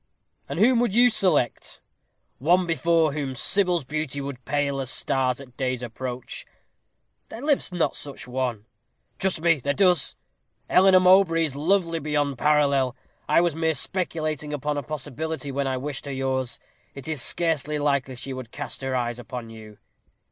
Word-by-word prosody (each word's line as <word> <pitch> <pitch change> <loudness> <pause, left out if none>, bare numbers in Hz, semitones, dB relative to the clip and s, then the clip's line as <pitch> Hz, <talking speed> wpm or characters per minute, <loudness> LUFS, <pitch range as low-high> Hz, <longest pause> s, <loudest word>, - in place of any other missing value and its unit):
"And - - -4
whom 235 +5 +4
would 235 -4 +1
you 245 +1 +6
select?" 165 - 0 0.6
"One 175 +7 +3
before 165 -1 +2
whom 140 -3 -3
Sybil's 180 +3 +2
beauty 145 0 -3
would 135 -2 -6
pale 140 -1 0
as 130 -2 -3
stars 130 -2 0
at 130 -3 -13
day's 130 -2 -2
approach." 125 +1 -6 0.9
"There 225 - -8
lives 285 -6 +1
not 175 -2 0
such 140 -1 -8
a 125 - -13
one." 125 -5 -2 0.5
"Trust 190 -4 0
me 165 -2 +3
there 140 +2 -1
does. 180 -6 +3 0.5
Eleanor 185 0 +6
Mowbray 180 -3 +5
is 145 -4 -1
lovely 165 +2 +1
beyond 145 -3 -1
parallel. 140 -4 +2 0.3
I - - +5
was 175 -2 +1
merely 160 0 0
speculating 155 -3 -2
upon 150 +1 -2
a 145 - -1
possibility 150 +1 -5
when 140 0 -1
I 130 -1 -1
wished 140 +1 -5
her - - -3
yours 130 -1 -2 0.4
it 140 0 -8
is 155 -5 -1
scarcely 150 0 0
likely 140 -3 0
she 135 +2 -6
would 130 -3 -7
cast 145 +2 -6
her 135 -1 -2
eyes 120 -1 -2
upon 120 0 -7
you." 110 -2 -12
145 Hz, 165 wpm, -25 LUFS, 130-165 Hz, 0.9 s, you